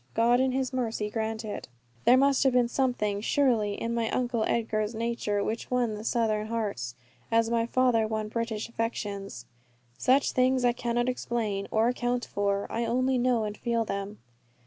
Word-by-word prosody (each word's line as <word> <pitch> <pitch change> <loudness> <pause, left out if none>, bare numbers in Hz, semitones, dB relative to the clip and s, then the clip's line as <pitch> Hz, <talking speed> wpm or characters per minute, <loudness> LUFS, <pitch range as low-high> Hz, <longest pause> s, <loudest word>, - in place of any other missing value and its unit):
God 235 +2 +4
in 260 0 +2
His 260 0 -1
mercy 225 -4 -2
grant 220 0 -3
it. 210 - -5 0.4
There 250 - +7
must 275 +1 +4
have 265 -2 +3
been 245 -1 +4
something 235 -6 0
surely 225 -5 +2
in 230 +2 -3
my 230 -1 0
Uncle 240 -3 0
Edgar's 220 -1 -1
nature, 225 -3 -1
which 225 +3 -3
won 245 -3 +1
the 210 0 -6
Southern 220 -2 0
hearts, 205 - -3 0.4
as 230 0 +3
my 230 0 +1
father 240 -3 +2
won 215 -1 -2
British 225 -1 -3
affections. 205 - -4 0.5
Such 265 +2 +3
things 255 0 +2
I 245 - +5
cannot 240 0 -1
explain, 225 -5 -2
or 220 +1 +2
account 245 0 -1
for. 200 0 -1
I 230 - -1
only 255 +2 +1
know 245 -2 +2
and 210 -1 -3
feel 230 -1 -1
them. 200 +1 -4
230 Hz, 170 wpm, -28 LUFS, 215-245 Hz, 0.5 s, There